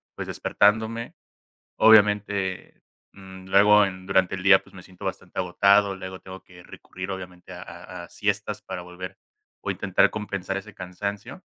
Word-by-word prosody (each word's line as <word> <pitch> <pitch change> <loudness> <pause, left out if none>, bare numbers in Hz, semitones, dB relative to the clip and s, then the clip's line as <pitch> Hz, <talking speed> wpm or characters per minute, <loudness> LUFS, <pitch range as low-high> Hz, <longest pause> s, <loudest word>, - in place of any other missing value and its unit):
pues - - -5
despertándome. 110 +3 +1 0.6
Obviamente, 105 -3 +3 0.3
mm, 95 -1 -12
luego, 105 +2 +6
em, 95 -1 -6
durante 95 -1 +2
el 95 - -8
día 95 -1 +7
pues - - -21
me 90 - -12
siento 95 -1 -13
bastante - - -4
agotado, 100 +2 +3
luego 95 0 -8
tengo 95 0 -10
que 90 -1 -16
recurrir 95 +2 -9
obviamente 90 -1 -8
a 90 0 -9
a 85 0 -10
a - - -14
siestas - - -2
para 90 - -6
volver 90 +1 -9 0.4
o - - -4
intentar - - +2
compensar 100 -3 -4
ese 105 +2 -7
cansancio, 100 - -6
95 Hz, 155 wpm, -25 LUFS, 90-105 Hz, 0.6 s, día